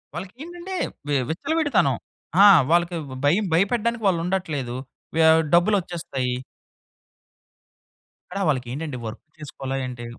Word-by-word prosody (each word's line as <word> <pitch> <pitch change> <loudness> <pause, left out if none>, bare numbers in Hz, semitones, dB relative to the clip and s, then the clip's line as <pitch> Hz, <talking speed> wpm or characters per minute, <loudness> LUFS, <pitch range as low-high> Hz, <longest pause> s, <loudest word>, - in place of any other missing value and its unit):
వాళ్ళకేంటంటే 330 - -7 0.3
వి 145 - +1
విచ్చలవిడితనం. 310 - +1 0.5
ఆ! - - +10 0.3
వాళ్ళకి 175 0 +3 0.3
భయం 185 +9 +3
భయపెట్టడానికి 230 +6 +1
వాళ్ళుండట్లేదు. 165 -8 -1 0.4
వ్య 165 - +4 0.3
డబ్బులొచ్చేస్తాయి. 170 -9 +1 1.9
అక్కడ 195 - -4
వాళ్ళకెంటంటే 135 +1 -2
వర్క్ 110 - -6 0.2
చేసుకోవాలా 135 -3 -5
ఏంటి? 120 -1 -7
170 Hz, 90 wpm, -23 LUFS, 140-205 Hz, 1.9 s, ఆ